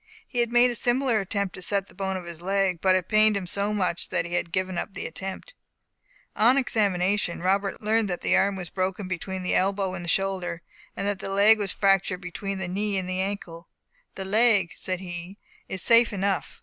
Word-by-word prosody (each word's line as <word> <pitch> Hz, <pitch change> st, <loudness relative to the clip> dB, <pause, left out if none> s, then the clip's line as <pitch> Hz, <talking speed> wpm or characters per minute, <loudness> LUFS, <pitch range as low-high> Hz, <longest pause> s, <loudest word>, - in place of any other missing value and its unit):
He 245 Hz, -, -3 dB
had 235 Hz, -1 st, +1 dB
made 245 Hz, +1 st, +5 dB
a -, -, -3 dB
similar 240 Hz, 0 st, +1 dB
attempt 200 Hz, 0 st, -2 dB
to -, -, -9 dB
set 200 Hz, +1 st, 0 dB
the -, -, -19 dB
bone 190 Hz, 0 st, -3 dB
of 180 Hz, -, -8 dB
his 170 Hz, -1 st, -9 dB
leg, 190 Hz, -2 st, 0 dB
but 190 Hz, -1 st, +4 dB
it 185 Hz, -2 st, -1 dB
pained 215 Hz, -1 st, +4 dB
him 195 Hz, -, -4 dB
so 200 Hz, +4 st, 0 dB
much 185 Hz, -5 st, -1 dB
that -, -, -1 dB
he 175 Hz, -, -7 dB
had 175 Hz, -1 st, -1 dB
given 185 Hz, +1 st, -1 dB
up 190 Hz, +3 st, -4 dB
the -, -, -5 dB
attempt. 190 Hz, -, -7 dB, 0.8 s
On 240 Hz, +5 st, +4 dB
examination, 200 Hz, -6 st, +1 dB
Robert 195 Hz, +2 st, 0 dB
learned 220 Hz, 0 st, +1 dB
that 180 Hz, -, -3 dB
the -, -, +2 dB
arm 200 Hz, +1 st, +2 dB
was 180 Hz, -3 st, -6 dB
broken 185 Hz, +1 st, -2 dB
between 185 Hz, +1 st, -4 dB
the 180 Hz, -, 0 dB
elbow 195 Hz, 0 st, +1 dB
and 175 Hz, -2 st, -5 dB
shoulder, 185 Hz, -2 st, -1 dB, 0.3 s
and 195 Hz, -, -2 dB
that 205 Hz, -1 st, -1 dB
the -, -, -6 dB
leg 205 Hz, +3 st, +5 dB
was 200 Hz, -2 st, +1 dB
fractured 195 Hz, -2 st, +1 dB
between 195 Hz, +2 st, -5 dB
the 190 Hz, -1 st, -4 dB
knee 200 Hz, +2 st, -1 dB
and 185 Hz, -1 st, -2 dB
ankle. 185 Hz, -3 st, -4 dB, 0.5 s
"The 190 Hz, -, -5 dB
leg," 205 Hz, -3 st, +3 dB
said 185 Hz, -1 st, -3 dB
he, 175 Hz, +1 st, -7 dB, 0.3 s
"is 190 Hz, -, +1 dB
safe 235 Hz, 0 st, +6 dB
enough. 200 Hz, -1 st, -2 dB
195 Hz, 210 wpm, -26 LUFS, 185-205 Hz, 0.8 s, safe